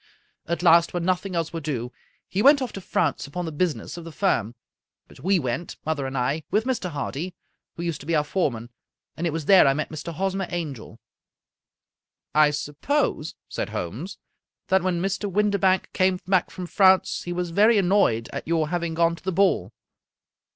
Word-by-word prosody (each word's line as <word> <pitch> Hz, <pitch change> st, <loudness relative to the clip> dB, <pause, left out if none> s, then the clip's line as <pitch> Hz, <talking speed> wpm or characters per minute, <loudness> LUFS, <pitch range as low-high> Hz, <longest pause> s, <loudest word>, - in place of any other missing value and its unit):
At 170 Hz, +1 st, -2 dB
last, 170 Hz, 0 st, +5 dB
when 175 Hz, -1 st, -1 dB
nothing 185 Hz, +1 st, -1 dB
else 165 Hz, -1 st, -2 dB
would 165 Hz, -, -4 dB
do, 125 Hz, -5 st, -3 dB, 0.4 s
he 195 Hz, -, -1 dB
went 280 Hz, +4 st, +7 dB
off 255 Hz, -4 st, -4 dB
to 195 Hz, -, -6 dB
France -, -, -1 dB
upon 175 Hz, +5 st, -4 dB
the 160 Hz, -, -4 dB
business 165 Hz, +2 st, -2 dB
of 170 Hz, -, -7 dB
the 165 Hz, -, -9 dB
firm; 120 Hz, -, 0 dB, 0.5 s
but -, -, -17 dB
we 190 Hz, +2 st, +2 dB
went, 130 Hz, +2 st, -3 dB
mother 150 Hz, -3 st, -1 dB
and 135 Hz, 0 st, -4 dB
I, 140 Hz, +5 st, 0 dB
with 215 Hz, -, +2 dB
Mr. 250 Hz, -8 st, -1 dB
Hardy, 155 Hz, +3 st, -4 dB, 0.4 s
who 170 Hz, -, -5 dB
used 170 Hz, -3 st, -2 dB
to 140 Hz, -, -12 dB
be 165 Hz, -, +1 dB
our 150 Hz, -, +3 dB
foreman, 125 Hz, -9 st, -2 dB, 0.4 s
and 170 Hz, -, -2 dB
it -, -, +1 dB
was 160 Hz, -1 st, -4 dB
there 190 Hz, -4 st, +7 dB
I 135 Hz, -, +3 dB
met 155 Hz, -, -2 dB
Mr. 155 Hz, +2 st, -6 dB
Hosmer 190 Hz, +3 st, -2 dB
Angel." 140 Hz, -10 st, -5 dB, 0.7 s
" -, -, -65 dB
I 150 Hz, -1 st, +6 dB
suppose," 150 Hz, -, -1 dB
said -, -, -4 dB
Holmes, 125 Hz, -, -5 dB, 0.3 s
" -, -, -61 dB
that 190 Hz, 0 st, +4 dB
when 175 Hz, -1 st, -1 dB
Mr. 195 Hz, +1 st, -2 dB
Windibank 200 Hz, -2 st, +2 dB
came 185 Hz, -1 st, +2 dB
back 185 Hz, -2 st, +2 dB
from 185 Hz, -, -7 dB
France, 190 Hz, +1 st, +3 dB
he 175 Hz, -, -4 dB
was 175 Hz, -1 st, -2 dB
very 215 Hz, +5 st, +5 dB
annoyed 175 Hz, -, +2 dB
at -, -, -5 dB
your 160 Hz, -2 st, +1 dB
having 170 Hz, -1 st, -2 dB
gone 170 Hz, 0 st, +2 dB
to -, -, -17 dB
the 190 Hz, -, -1 dB
ball?" 195 Hz, +2 st, +2 dB
170 Hz, 195 wpm, -24 LUFS, 150-190 Hz, 0.7 s, went